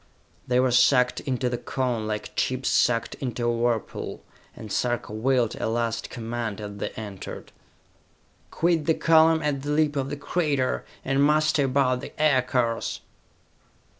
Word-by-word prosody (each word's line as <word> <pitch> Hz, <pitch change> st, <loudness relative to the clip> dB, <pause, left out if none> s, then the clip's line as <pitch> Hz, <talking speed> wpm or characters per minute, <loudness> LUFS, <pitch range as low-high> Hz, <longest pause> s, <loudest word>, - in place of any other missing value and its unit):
They 125 Hz, 0 st, +2 dB
were 130 Hz, 0 st, +3 dB
sucked 125 Hz, 0 st, +4 dB
into 130 Hz, -3 st, -2 dB
the 120 Hz, -1 st, -2 dB
Cone 125 Hz, -5 st, -2 dB
like 105 Hz, -1 st, -4 dB
chips 130 Hz, 0 st, 0 dB
sucked 115 Hz, -2 st, +2 dB
into 125 Hz, -2 st, -2 dB
a 120 Hz, -, +2 dB
whirlpool, 115 Hz, -2 st, -2 dB, 0.3 s
and 110 Hz, -, -9 dB
Sarka 120 Hz, -3 st, -1 dB
willed 120 Hz, +1 st, +1 dB
a -, -, -2 dB
last 115 Hz, 0 st, -2 dB
command 115 Hz, -3 st, -4 dB
as 100 Hz, -1 st, -7 dB
they -, -, -3 dB
entered: 100 Hz, -4 st, -8 dB, 1.0 s
"Quit 165 Hz, -2 st, +1 dB
the 160 Hz, -, +4 dB
column 160 Hz, -1 st, +4 dB
at 145 Hz, -2 st, -1 dB
the 145 Hz, -, -5 dB
lip 150 Hz, 0 st, +2 dB
of 135 Hz, -1 st, -1 dB
the 145 Hz, -, -4 dB
crater, 145 Hz, -4 st, -1 dB, 0.2 s
and 135 Hz, +1 st, +2 dB
muster 150 Hz, -1 st, +3 dB
about 130 Hz, -1 st, +1 dB
the -, -, -10 dB
aircars!" 125 Hz, -5 st, +1 dB
125 Hz, 150 wpm, -25 LUFS, 115-145 Hz, 1.0 s, sucked